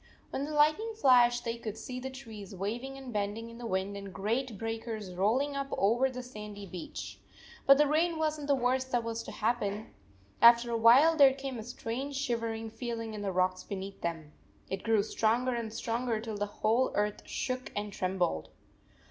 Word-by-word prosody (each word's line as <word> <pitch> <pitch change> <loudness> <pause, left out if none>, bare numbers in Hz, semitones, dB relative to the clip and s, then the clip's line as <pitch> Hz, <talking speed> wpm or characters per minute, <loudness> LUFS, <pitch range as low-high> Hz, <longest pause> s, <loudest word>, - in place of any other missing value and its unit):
When 275 - -2
the 305 - -5
lightning 310 +10 +3
flashed, 245 -2 +5
they 230 0 -2
could 220 -2 -5
see 250 -1 -6
the 265 +1 -5
trees 220 -7 -9
waving 235 +8 -4
and 265 -3 -8
bending 210 +3 -2
in 230 - -11
the 240 - -5
wind 190 0 -1
and 200 -1 -7
great 225 +4 -2
breakers 225 -3 -4
rolling 240 +10 +1
up 275 0 -2
over 235 +7 +3
the 255 -1 -6
sandy 210 -4 -8
beach. 180 -2 -7 0.5
But 275 0 +9
the 295 - +5
rain 320 +3 +2
was 310 -1 0
n 290 - -5
t - - -8
the 285 - +4
worst 260 +1 0
that 245 -1 +1
was 230 0 -3
to - - -8
happen. 215 -2 -1 0.5
After 235 0 +7
a - - +1
while 250 +9 +7
there 275 -3 +7
came 270 -3 -5
a - - -5
strange 245 +4 -4
shivering 230 -4 -2
feeling 230 -1 -4
in 210 - -5
the 200 -1 -1
rocks 185 0 +1
beneath 195 0 -6
them. 165 -3 -4 0.4
It 190 0 -2
grew 220 -3 +3
stronger 235 +4 +1
and 230 -2 -3
stronger 230 0 -1
till 220 -1 -5
the 205 - 0
whole 225 +5 +1
earth 210 0 0
shook 255 -1 -3
and 205 0 -3
trembled. 180 - -1
230 Hz, 195 wpm, -31 LUFS, 210-260 Hz, 0.5 s, But